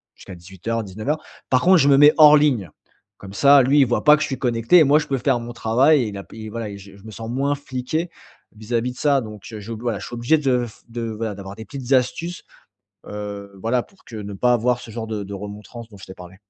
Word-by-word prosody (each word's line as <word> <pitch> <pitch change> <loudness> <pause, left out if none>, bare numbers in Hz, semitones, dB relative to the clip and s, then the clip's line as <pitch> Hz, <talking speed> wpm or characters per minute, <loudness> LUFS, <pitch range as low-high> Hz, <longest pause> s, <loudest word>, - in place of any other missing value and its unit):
jusqu'à 95 - -12
18:00, 95 +6 -5
19:00. 110 +11 -4 0.3
Par 130 -1 +3
contre, 185 +2 +5
je 145 -4 +3
me 140 - +6
mets 145 +1 +7
hors 150 -1 +8
ligne. 125 - +1 0.5
Comme 100 0 -11
ça, 140 +4 +6
lui, 140 +4 +3
il - - +5
voit 120 - -1
pas 150 0 +7
que 155 - -2
je - - -2
suis 135 - -4
connecté 120 +5 +3
et 160 - +7
moi, 145 +2 +4
je - - -4
peux 135 - -1
faire 120 - +1
mon 120 0 -8
travail. 130 +6 +3
Et 105 - -5
la 100 -1 -7
p - - -16
et - - -7
voilà, 115 -1 -5
et 100 - -8
je 100 0 -14
je 100 - -18
me 110 - -10
sens 115 +1 -8
moins 135 +4 0
fliqué 140 +5 -4 0.5
vis-à-vis 115 +3 -3
de - - -19
ça. 140 -3 +2
Donc 105 -2 -10
heu, 110 - -6
je, 110 +3 -9
voilà, 110 -2 -3
je 100 - -8
suis - - -7
obligé 120 +7 +2
de 125 -4 +1
f 110 - -17
de 115 0 -5
voilà, 110 -2 -4
d'avoir 95 0 -9
des 110 - -10
petites 135 -1 -4
astuces. 150 +8 -1 0.6
Heu, 100 -1 -7
voilà, 120 +3 0
pour 195 - -25
que 115 - -10
ne 105 -1 -7
pas 125 +5 +2
avoir 120 +1 +1
ce - - -11
genre 115 0 -5
de 105 -2 -4
de 100 +1 -8
remontrance 105 +4 -9
dont 105 - -15
je - - -11
t'ai 95 - -10
parlé. 90 0 -13
115 Hz, 265 wpm, -21 LUFS, 105-135 Hz, 0.6 s, hors